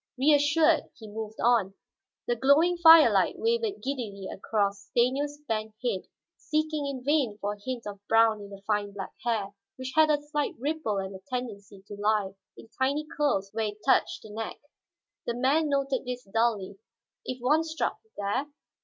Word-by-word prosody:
Reassured, 300 Hz, +4 st, +4 dB
he 220 Hz, -, -11 dB
moved 220 Hz, +1 st, -7 dB
on. 225 Hz, -5 st, +2 dB, 0.5 s
The 240 Hz, -, 0 dB
glowing 285 Hz, +8 st, +4 dB
firelight 330 Hz, -2 st, +7 dB
wavered 455 Hz, -3 st, -1 dB
giddily 225 Hz, -8 st, -4 dB
across 200 Hz, -1 st, -2 dB
Stanief's 275 Hz, +6 st, +1 dB
bent 220 Hz, -1 st, -2 dB
head, 220 Hz, -7 st, -2 dB, 0.3 s
seeking 310 Hz, -1 st, -1 dB
in 265 Hz, -3 st, -5 dB
vain 275 Hz, -7 st, +1 dB
for 205 Hz, +1 st, -2 dB
a 205 Hz, -, -13 dB
hint 255 Hz, -1 st, -4 dB
of 205 Hz, -1 st, -7 dB
brown 225 Hz, -1 st, +4 dB
in 200 Hz, -, -9 dB
the 200 Hz, 0 st, -11 dB
fine 205 Hz, -1 st, -1 dB
black 195 Hz, -1 st, -6 dB
hair, 215 Hz, -4 st, -1 dB, 0.2 s
which 260 Hz, 0 st, -6 dB
had 315 Hz, 0 st, +6 dB
a 295 Hz, -1 st, +3 dB
slight 295 Hz, 0 st, -2 dB
ripple 285 Hz, -5 st, -2 dB
and 195 Hz, 0 st, -4 dB
a -, -, -9 dB
tendency 205 Hz, -6 st, -6 dB
to -, -, -8 dB
lie 210 Hz, -2 st, +1 dB, 0.3 s
in -, -, -13 dB
tiny 285 Hz, +3 st, +1 dB
curls 235 Hz, -11 st, 0 dB
where 220 Hz, 0 st, 0 dB
it 210 Hz, 0 st, -8 dB
touched -, -, +2 dB
the 215 Hz, -, -11 dB
neck. 220 Hz, +1 st, -5 dB, 0.7 s
The 235 Hz, -, -1 dB
man 285 Hz, +5 st, +2 dB
noted 275 Hz, -2 st, 0 dB
this 250 Hz, 0 st, -5 dB
dully. 205 Hz, -2 st, -1 dB, 0.4 s
If 255 Hz, 0 st, -5 dB
one 295 Hz, +6 st, +3 dB
struck 320 Hz, 0 st, -2 dB, 0.2 s
there? 205 Hz, +8 st, -1 dB
240 Hz, 170 wpm, -28 LUFS, 205-290 Hz, 0.7 s, firelight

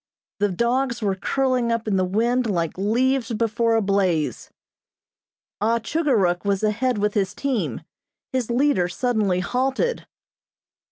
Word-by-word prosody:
The 205 Hz, 0 st, +2 dB
dogs 235 Hz, +5 st, 0 dB
were 200 Hz, -2 st, +1 dB
curling 255 Hz, +4 st, 0 dB
up 230 Hz, -1 st, -2 dB
in 205 Hz, -, +1 dB
the 185 Hz, -, +2 dB
wind 230 Hz, +6 st, +1 dB
like 170 Hz, -5 st, -1 dB
leaves 240 Hz, +5 st, +1 dB
before 230 Hz, +1 st, +1 dB
a 225 Hz, -, +2 dB
blaze. 190 Hz, -6 st, 0 dB, 1.1 s
Ah 225 Hz, +2 st, +2 dB
Chugor 285 Hz, +3 st, 0 dB
Ruk 175 Hz, -3 st, +1 dB
was 200 Hz, 0 st, 0 dB
ahead 215 Hz, +3 st, +1 dB
with 210 Hz, 0 st, 0 dB
his 205 Hz, 0 st, -1 dB
team. 270 Hz, -3 st, -2 dB, 0.5 s
His 255 Hz, -3 st, -1 dB
leader 240 Hz, -7 st, +2 dB
suddenly 205 Hz, -2 st, 0 dB
halted. 265 Hz, -, -1 dB
225 Hz, 135 wpm, -23 LUFS, 195-250 Hz, 1.1 s, The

